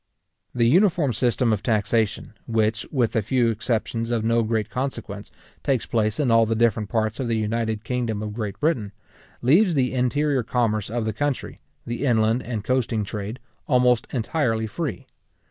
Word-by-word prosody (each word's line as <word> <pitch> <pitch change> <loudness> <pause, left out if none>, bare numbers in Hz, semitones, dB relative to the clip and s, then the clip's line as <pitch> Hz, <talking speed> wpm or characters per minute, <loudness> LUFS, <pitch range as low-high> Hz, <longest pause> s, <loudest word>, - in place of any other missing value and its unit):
The 120 -1 +3
uniform 170 - +3
system 120 0 +1
of 105 - -2
taxation, 110 -1 0
which, 110 -1 0
with 125 -4 0
a 115 - +3
few 120 +2 +2
exception 115 +1 -2
of 115 -2 0
no 115 +1 +2
great 110 -2 -1
consequence, 125 -6 -4 0.3
takes 135 -5 0
place 110 0 0
in 135 -5 +2
all 115 -1 +5
the 115 - 0
different 110 -2 +1
parts 110 0 -1
of 130 - -1
the 115 -1 0
united 110 0 -1
kingdom 120 -4 -2
of 105 -1 -5
Great 105 -3 -4
Britain, 125 -11 0 0.5
leaves 170 - +4
the 130 -2 +1
interior 135 +2 +1
commerce 110 -3 0
of 115 0 -2
the 110 - -1
country, 145 +4 -2 0.3
the 120 +3 -4
inland 115 -2 +2
and 110 -3 -4
coasting 115 -3 0
trade, 105 +3 -5 0.3
almost 125 -2 +3
entirely 115 -3 0
free. 130 +5 -4
115 Hz, 165 wpm, -24 LUFS, 110-125 Hz, 0.5 s, all